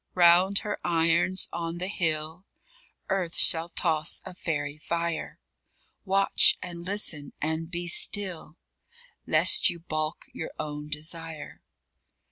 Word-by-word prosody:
_Round 180 +3 +4
her 210 -1 -5
irons, 170 +2 +1
on 165 0 -5
the 180 +1 -5
hill, 160 -1 -3 0.6
Earth 185 -3 -2
shall 165 +1 +5
toss 160 -2 0
a - - -9
fairy 150 -4 -5
fire. 170 0 -4 0.7
Watch 195 0 +5
and 170 -1 -9
listen 175 -7 -2
and 160 +1 -3
be 175 0 -5
still, 180 -3 0 0.7
Lest - - +5
you 170 - -6
baulk 155 -1 -4
your 160 - -7
own 150 0 -7
desire. 155 +1 -4
170 Hz, 115 wpm, -26 LUFS, 155-180 Hz, 0.7 s, shall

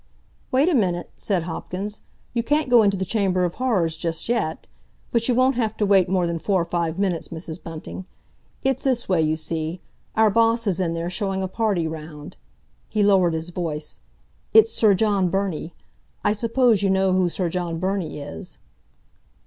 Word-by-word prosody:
"Wait 270 +5 +3
a 360 - +3
minute," 180 - 0
said 190 -5 -1
Hopkins; 185 +5 -5 0.3
"you 235 - +1
can't 290 +2 0
go 240 -2 +8
into 200 -2 +2
the 190 - -2
Chamber 185 -2 +1
of 175 - -2
Horrors 195 -11 0
just 165 0 -3
yet. 225 -9 -1 0.5
But 230 -1 +1
you 245 - +3
won't 255 +2 +4
have 220 -3 -1
to 210 - +1
wait 195 -3 +4
more 185 -2 +2
than 170 -1 -2
four 195 +2 +1
or - - -7
five 170 -1 -2
minutes, 190 -4 -1
Mrs. 165 0 -7
Bunting. 165 +2 -8 0.6
It's 270 -1 0
this 255 -3 0
way, 180 -4 +2
you 155 0 +1
see; 160 +2 -3 0.4
our 220 -1 +4
boss 230 +1 +3
is 190 -3 0
in 170 -3 0
there, 170 +1 -3
showing 195 -1 -2
a - - -1
party 195 -4 0
round." 155 -1 -8 0.5
He 215 -1 +1
lowered 185 -5 +4
his 160 +2 -4
voice. 160 -4 -4 0.5
"It's 220 0 +6
Sir 210 -3 +4
John 200 -2 +2
Burney—I 195 +2 -3
suppose 230 0 +2
you 200 - +2
know 190 0 +2
who 185 -1 +2
Sir 180 +1 -1
John 170 -1 -2
Burney 185 -3 -2
is?" 80 - -8
190 Hz, 180 wpm, -23 LUFS, 170-220 Hz, 0.6 s, go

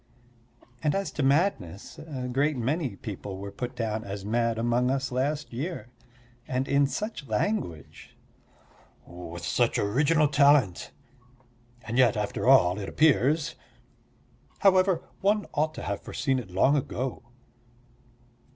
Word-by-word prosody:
And 150 +1 +1
as 195 0 -2
to - - -3
madness, 135 - 0
a 135 -5 -6
great 140 +3 0
many 130 - -1
people 100 -1 -7
were 100 +1 -7
put 125 +3 -5
down 110 -2 -2
as 100 -2 -6
mad 115 +1 0
among 120 +2 +1
us 135 0 -1
last 140 +3 -2
year. 140 +1 -5 0.6
And 130 +1 -1
in 140 0 +3
such 205 -2 -5
language! 105 - -3 0.9
"With 85 -1 -8
such 120 -1 +1
original 150 +9 +2
talent"... 140 - +3 0.9
"and 115 +3 -2
yet, 120 -5 +4
after 105 - -2
all, 100 -8 +5
it 100 - -5
appears"... 155 +1 +2 1.1
"however, 190 -2 +4 0.2
one 205 +2 +1
ought 155 +1 0
to - - -6
have - - -3
foreseen 135 -3 -1
it 110 -7 -9
long 115 +11 +3
ago." 130 -2 -3
130 Hz, 130 wpm, -27 LUFS, 110-150 Hz, 1.1 s, all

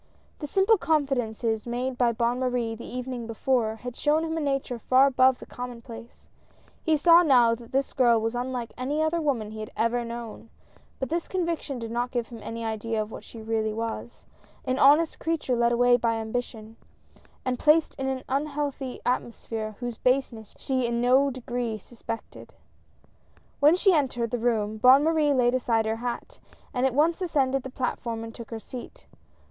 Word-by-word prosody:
The 295 - -5
simple 390 +6 +3
confidences 245 -8 0
made 250 +2 -2
by 245 -1 +2
Bonne 235 +2 0
Marie 250 -3 -1
the 225 - -9
evening 250 -2 -5
before, 230 -1 0
had 245 +2 -8
shown 305 +2 +2
him 320 0 -2
a - - -1
nature 275 -4 -2
far 260 +4 +5
above 260 -1 +4
the - - -11
common 245 -1 -7
place; 235 -1 -12 0.5
he 315 -1 +2
saw 335 +3 +7
now 250 -8 +5
that 230 0 -9
this 270 +1 0
girl 240 -3 +4
was 225 +1 -2
unlike 245 -1 -3
any 285 +5 -1
other 325 +2 0
woman 240 -8 -1
he 215 - -8
had 215 - -6
ever 235 +1 +1
known 235 -1 -7 0.2
— - - -31
but 265 - -3
this 335 +1 -2
conviction 335 -6 -2
did 230 -1 -6
not 240 +1 -1
give 240 -3 -3
him 235 -2 -9
any 230 0 -5
idea 220 0 -2
of 215 0 -3
what - - -8
she 225 -2 -11
really 220 -1 -1
was 230 +1 -5 0.2
— - - -29
an 255 0 -1
honest 300 +4 +5
creature 320 -6 -1
led 235 0 +2
away 245 +1 +4
by 230 -1 0
ambi 225 +2 -1
tion, 220 -1 -13 0.7
and 255 -1 -1
placed 310 +1 +4
in 265 - -1
an 265 -1 -2
unhealthy 280 -1 -3
atmosphere 225 -3 -3
whose 240 -2 -4
baseness 250 -4 0
she 260 -2 -1
in 235 0 -1
no 260 +3 +4
degree 245 -3 -3
suspected. 225 +1 -9 1.0
When 300 +4 +6
she 380 +1 +4
entered 250 -7 0
the 245 - -1
room, 220 -2 0
Bonne 260 +5 +7
Marie 310 -2 +2
laid 245 -1 +3
aside 230 -3 +1
her 220 +1 -1
hat, 240 +1 -5 0.3
and 255 +1 +2
at 255 - -3
once 325 +5 +2
ascended 270 -6 +1
the 260 - -7
platform 240 -3 -3
and 225 0 -8
took 235 -1 -10
her 225 - -5
seat. 255 - -10
245 Hz, 190 wpm, -26 LUFS, 230-275 Hz, 1.0 s, saw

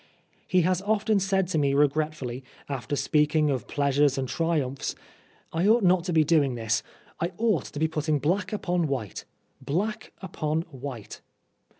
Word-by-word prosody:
He 185 - +3
has 180 +1 +1
often 215 0 +1
said 190 -1 +1
to 160 - +1
me 140 -1 +2
regretfully, 145 -3 0 0.2
after 140 0 -3
speaking 150 +1 +2
of 130 -3 -3
pleasures 140 -1 +2
and 130 -1 -1
triumphs, 150 -4 -1 0.3
" - - -33
I 170 +4 +1
ought 225 +1 +5
not 180 -1 +3
to 180 - -1
be 160 -2 +4
doing 145 -5 +2
this. 115 -2 0 0.4
I 170 +2 -2
ought 215 - +1
to - - -9
be 160 +2 +2
putting 155 -1 0
black 175 +8 0
upon 180 -5 0
white 125 - -4 0.4
black 180 +11 -2
upon 160 -4 -2
white." 130 -5 -8
155 Hz, 165 wpm, -26 LUFS, 140-180 Hz, 0.4 s, ought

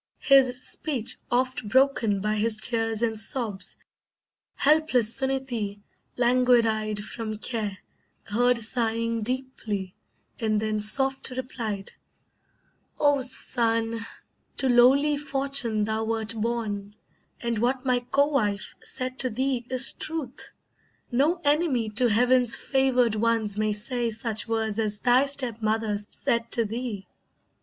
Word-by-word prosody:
His 260 -2 +3
speech 265 -8 -3
oft 255 -2 -1
broken 250 -6 +2
by 210 +1 -1
his 215 +1 +1
tears 225 0 0
and 220 -2 +1
sobs, 220 -4 +1 0.8
Helpless 275 -7 +3
Suneetee, 260 -7 -2 0.4
languid 245 -1 +3
eyed 215 -1 -2
from 220 -2 -6
care, 215 -3 -4 0.5
Heard 245 +4 +1
sighing 230 0 -1
deeply, 215 -6 -4 0.5
and 215 -2 0
then 215 0 -1
soft 270 +7 +4
replied: 240 -6 -5 1.1
"Oh 290 -2 +3
son, 230 -3 0 0.6
to 265 - 0
lowly 265 +4 +4
fortune 275 -6 0
thou 220 +1 -2
wert 225 0 -2
born, 215 -3 -4 0.4
And 235 -2 -2
what 250 +3 -1
my 250 -1 +2
co 275 +3 +1
wife 210 -9 -2
said 255 +1 -5
to 255 - +1
thee 250 +1 -2
is 255 +1 +3
truth; 310 -6 -5 0.6
No 295 +8 +1
enemy 285 -7 +1
to 245 +4 +2
Heaven's 245 +2 +4
favoured 255 -4 +1
ones 220 -1 0
may 215 0 0
say 235 +3 -2
Such 225 -1 -2
words 225 -1 -2
as 210 -2 0
thy 255 +3 +4
step 255 -5 0
mother 215 -1 -1
said 235 0 -2
to 230 - +1
thee. 220 -3 -5
235 Hz, 125 wpm, -25 LUFS, 215-260 Hz, 1.1 s, soft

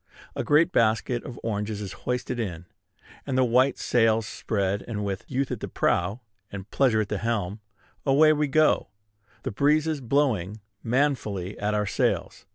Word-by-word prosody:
A - - -2
great 160 +4 +4
basket 115 0 +1
of 120 - -8
oranges 105 -1 -2
is 100 -3 -6 0.2
hoisted 125 0 -2
in, 90 -6 -4 0.6
and 130 -2 -1
the 130 - +5
white 125 +2 +3
sails 115 -2 +2
spread; 100 -2 -2
and 105 -3 -3
with 95 -1 -3
"Youth 135 0 -1
at - - -3
the - - -5
prow, 100 +8 0 0.3
and 100 -1 -7
Pleasure 120 -6 +3
at 105 - -2
the 105 - -2
helm," 110 -3 -2 0.4
away 150 +3 +5
we 150 0 0
go, 155 -3 +3 0.6
the 130 - -3
breezes 150 +5 +2
blowing 115 -7 0 0.2
manfully 115 -7 -1
at 105 +1 0
our 105 0 +1
sails. 100 - -1
115 Hz, 165 wpm, -26 LUFS, 105-135 Hz, 0.6 s, the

